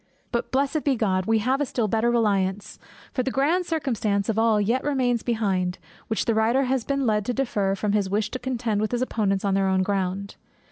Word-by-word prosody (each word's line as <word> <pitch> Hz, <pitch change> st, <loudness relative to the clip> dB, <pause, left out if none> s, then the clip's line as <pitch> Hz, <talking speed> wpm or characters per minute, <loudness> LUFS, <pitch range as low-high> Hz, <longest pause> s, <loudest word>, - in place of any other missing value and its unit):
But, 235 Hz, -, -2 dB
blessed 280 Hz, +3 st, 0 dB
be 280 Hz, -2 st, +2 dB
God, 190 Hz, -5 st, 0 dB
we 225 Hz, 0 st, +3 dB
have 255 Hz, +6 st, 0 dB
a -, -, +2 dB
still 235 Hz, -3 st, -1 dB
better 225 Hz, +3 st, +1 dB
reliance; 205 Hz, -3 st, 0 dB, 0.3 s
for 255 Hz, -, 0 dB
the 260 Hz, -, -1 dB
grand 320 Hz, +8 st, +1 dB
circumstance 225 Hz, -, -1 dB
of 225 Hz, 0 st, +1 dB
all 225 Hz, -2 st, +3 dB
yet 230 Hz, +6 st, +1 dB
remains 255 Hz, -5 st, +1 dB
behind, 195 Hz, -6 st, -1 dB, 0.3 s
which 220 Hz, -, -1 dB
the 230 Hz, -, +2 dB
writer 225 Hz, +5 st, +2 dB
has 260 Hz, -1 st, 0 dB
been 275 Hz, +2 st, -1 dB
led 210 Hz, -2 st, +2 dB
to 245 Hz, -, -2 dB
defer, 205 Hz, -7 st, 0 dB
from 205 Hz, +1 st, -1 dB
his 205 Hz, -2 st, +1 dB
wish 210 Hz, +2 st, -1 dB
to 255 Hz, -, -4 dB
contend 240 Hz, -5 st, -1 dB
with 215 Hz, +2 st, -2 dB
his 245 Hz, +1 st, +1 dB
opponents 200 Hz, -5 st, -1 dB
on 195 Hz, -, +1 dB
their 195 Hz, 0 st, +2 dB
own 190 Hz, 0 st, +2 dB
ground. 195 Hz, 0 st, -2 dB
225 Hz, 220 wpm, -24 LUFS, 200-255 Hz, 0.3 s, we